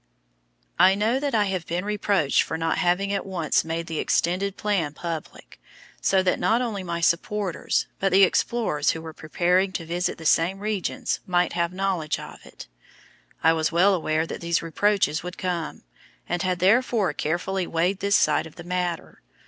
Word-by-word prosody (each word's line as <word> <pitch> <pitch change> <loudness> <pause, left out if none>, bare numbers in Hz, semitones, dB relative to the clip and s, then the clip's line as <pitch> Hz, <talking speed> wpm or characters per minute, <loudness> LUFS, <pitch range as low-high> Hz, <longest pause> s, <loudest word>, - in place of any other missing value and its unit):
I 190 - +6
know 220 +6 +1
that 280 -3 -1
I 210 - +4
have 185 -4 -3
been 175 +3 -2
reproached 205 -7 +1
for 160 - -3
not 165 +2 -1
having 190 +2 +1
at 200 - -1
once 175 -6 0
made 165 +1 -3
the 165 -2 -4
extended 185 +3 0
plan 190 -9 -1
public, 165 -1 -7 0.4
so 190 -1 +3
that 180 - +1
not 230 - +2
only 225 -6 -2
my 170 -2 -4
supporters, 185 +2 0
but 195 0 +1
the 195 +2 +6
explorers 190 -6 +1
who 160 - -1
were 160 -1 -8
preparing 180 +5 +1
to 170 -4 -4
visit 175 +2 -2
the 160 - -10
same 170 +5 +3
regions 205 -2 -2
might 180 -1 +1
have 170 0 0
knowledge 185 -5 -1
of - - -11
it. - - -12 0.8
I 160 +1 +5
was 160 -1 0
well 185 +4 +4
aware 160 -3 0
that - - -7
these 170 0 0
reproaches 165 -2 +1
would 180 +1 -7
come, 175 -3 -3 0.4
and 175 - -1
had 185 -1 0
therefore 210 +2 +2
carefully 175 +4 -2
weighed 180 +4 0
this 200 0 +2
side - - +2
of 160 - -16
the 175 - -10
matter. 180 -1 -3
180 Hz, 180 wpm, -24 LUFS, 165-195 Hz, 0.8 s, I